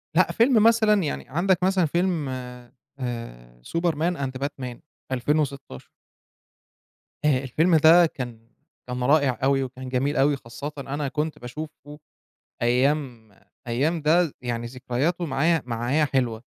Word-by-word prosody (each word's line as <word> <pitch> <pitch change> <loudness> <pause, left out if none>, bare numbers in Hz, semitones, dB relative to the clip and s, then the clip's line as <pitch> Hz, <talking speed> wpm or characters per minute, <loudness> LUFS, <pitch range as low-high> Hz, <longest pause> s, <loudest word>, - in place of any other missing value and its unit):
لأ، 185 - +4
فيلم 230 -2 +4
مثلًا 220 -3 +4
يعني 150 - -4
عندك 180 +5 +1
مثلًا 185 -2 +3
فيلم 170 -2 0 0.7
آآ - - -7 0.2
Superman 170 0 0
and 135 -2 -3
Batman 130 -4 -5 0.3
2016. 140 - -2 1.4
آآ 135 -3 +3
الفيلم 160 +7 +2
ده 160 +3 +7
كان 120 -6 -7 0.4
كان 125 0 -3
رائع 140 -3 +3
أوي 135 0 +3
وكان 130 0 -7
جميل 135 +3 0
أوي، 140 +1 +3
خاصةً 125 +5 -7
أنا 140 +1 -3
كنت 155 +2 -3
باشوفه 150 +3 -9 0.6
أيام 125 -2 0 0.4
أيام 145 +8 0
ده 160 +1 +3
يعني 120 -1 -3
ذكرياته 130 +8 -2
معايا، 155 +3 +1
معايا 125 +6 0
حلوة 125 -5 -1
140 Hz, 125 wpm, -24 LUFS, 125-160 Hz, 1.4 s, ده